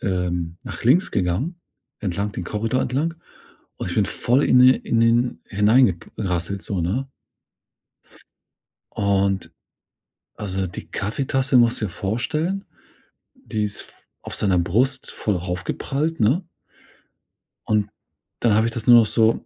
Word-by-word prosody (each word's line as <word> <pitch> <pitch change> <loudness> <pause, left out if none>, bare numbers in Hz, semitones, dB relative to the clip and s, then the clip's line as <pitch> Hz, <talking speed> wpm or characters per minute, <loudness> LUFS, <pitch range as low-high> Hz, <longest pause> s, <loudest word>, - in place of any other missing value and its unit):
ähm, 90 -3 -2
nach - - -8
links 160 +10 +4
gegangen. 100 - -1 0.4
Entlang 100 +1 -2
den 90 - -5
Korridor 110 +6 -1
entlang 150 +6 -1 0.6
und - - -4
ich - - -4
bin - - +2
voll 125 +4 +1
in 125 - +4
de 130 +1 +7
in 115 - -1
den 115 +2 +2
hineingek 105 -2 +3
rasselt 95 0 -2
so, 95 -3 -2
ne? 120 +11 -1 1.8
Und 100 -2 0 0.9
also, 95 -2 -3
die 90 - -8
Kaffeetasse, 130 +5 -1
musst 120 0 +4
dir 105 - -1
vorstellen, 155 - -2 0.7
die 110 - -3
ist 105 0 -4
f - - -18 0.3
auf - - -6
seiner 95 -4 +2
Brust 120 +10 +1
voll 105 -3 -1
aufgeprallt, 125 - -3
ne? 130 - +2 1.2
Und 105 -1 +1 0.5
dann 115 - +3
habe 110 +2 +3
ich - - -2
das 115 -1 -6
nur 120 -1 +9
noch 115 - +6
so 110 +1 +2
110 Hz, 135 wpm, -22 LUFS, 95-130 Hz, 1.8 s, nur